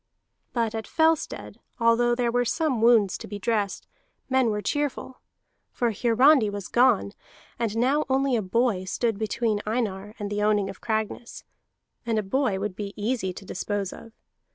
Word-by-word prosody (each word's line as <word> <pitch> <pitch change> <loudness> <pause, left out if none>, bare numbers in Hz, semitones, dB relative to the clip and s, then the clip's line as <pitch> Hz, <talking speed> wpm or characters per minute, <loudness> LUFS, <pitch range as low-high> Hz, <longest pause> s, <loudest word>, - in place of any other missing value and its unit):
But 230 -3 -1
at 220 -1 -4
Fellstead, 320 -1 0 0.2
although 235 +1 +3
there 240 -1 0
were 245 +1 +2
some 255 0 0
wounds 225 -5 +4
to - - -8
be 205 - -6
dressed, 205 -1 -1 0.5
men 260 -3 +3
were 210 -1 -1
cheerful. 285 +1 -3 0.5
For 240 -2 0
Hiarandi 240 +3 +4
was 200 -1 -6
gone, 240 -5 +3 0.5
and 225 -2 -1
now 270 +6 +2
only 265 -1 +2
a 225 - +1
boy 205 -1 0
stood 225 +2 -1
between 220 -1 -1
Einar 210 -2 -3
and 205 -1 -5
the 205 0 -1
owning 210 -2 +2
of 190 - -15
Cragness; 220 +1 -3 0.6
and 230 -2 -1
a 215 - +1
boy 205 -1 0
would 200 -1 -3
be 200 0 -5
easy 210 -2 -1
to 190 +2 -10
dispose 200 +1 -3
of. 230 - -12
225 Hz, 165 wpm, -26 LUFS, 205-245 Hz, 0.6 s, wounds